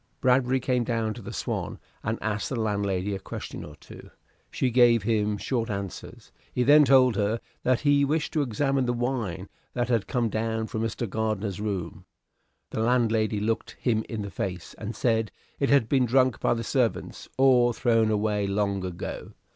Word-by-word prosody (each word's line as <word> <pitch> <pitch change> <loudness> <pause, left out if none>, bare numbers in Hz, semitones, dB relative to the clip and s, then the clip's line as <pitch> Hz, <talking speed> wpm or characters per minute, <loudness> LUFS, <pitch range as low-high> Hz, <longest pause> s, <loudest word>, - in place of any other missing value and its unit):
Bradbury 130 0 +3
came 125 -1 0
down 115 -2 -1
to 120 - -10
the - - -8
"Swan," - - -3 0.2
and 110 +2 -2
asked 105 -1 -2
the 130 - -2
landlady 100 -2 -1
a 95 - -3
question - - -7
or 75 - -10
two. - - -13 0.4
She 130 - -1
gave 120 -3 +5
him 105 -1 +1
short 115 +1 -2
answers. 100 -2 -6 0.2
He 125 - 0
then 145 +3 +7
told 130 -3 +5
her 105 +2 0 0.2
that 125 -1 +1
he 145 -1 +4
wished 155 +3 0
to 155 - +2
examine 135 +1 0
the 120 - +1
wine 120 -7 -2 0.3
that 120 -1 -1
had 115 -4 +1
come 120 -2 0
down 110 +1 -1
from 110 0 -4
Mr. 115 +1 -2
Gardiner's 105 -2 -2
room. 95 -2 -4 0.7
The - - -3
landlady 110 -3 +2
looked 110 +2 -2
him 110 -3 +1
in 110 -2 -3
the 100 - -6
face, 90 -3 -5
and 110 +1 -5
said 115 -3 +1 0.3
it 140 - +1
had 140 -5 +4
been 130 0 +2
drunk 130 0 +3
by - - +2
the 115 - -3
servants 125 0 -1
or 125 -2 +5
thrown 115 -2 +2
away 105 -1 0
long 100 -1 0
ago. 90 -2 -6
115 Hz, 180 wpm, -26 LUFS, 105-125 Hz, 0.7 s, then